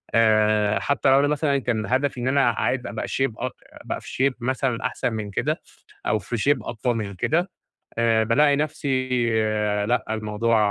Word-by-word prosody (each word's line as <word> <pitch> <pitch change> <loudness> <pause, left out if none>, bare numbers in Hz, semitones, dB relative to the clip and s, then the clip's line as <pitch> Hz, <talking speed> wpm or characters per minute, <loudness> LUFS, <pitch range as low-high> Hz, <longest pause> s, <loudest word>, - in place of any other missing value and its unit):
آآ، 110 -2 +3
حتى 140 -1 +1
لو 135 +1 +6
أنا 145 - +3
مثلًا 145 -1 +1
كان 115 -4 -1
هدفي 130 0 0
إن 125 - -1
أنا 135 -2 +3
عايز 125 +2 -1
أبقى - - -4
shape 135 -4 0
اك 125 0 -3
أبقى - - -7
في 135 +2 0
shape - - -10
مثلًا 130 -1 -1
أحسن 125 -3 -1
من 105 -2 -4
كده، - - -1 0.4
أو 105 0 +1
في 115 +5 -4
shape 140 +4 +2
أفضل 120 +1 -1
من 100 -3 -4
كده، 170 - 0 0.5
آآ 115 -1 +3
بالاقي 140 +6 +4
نفسي 135 -3 -1 0.8
لأ 120 0 0
الموضوع 110 +1 0
120 Hz, 175 wpm, -24 LUFS, 110-135 Hz, 0.8 s, لو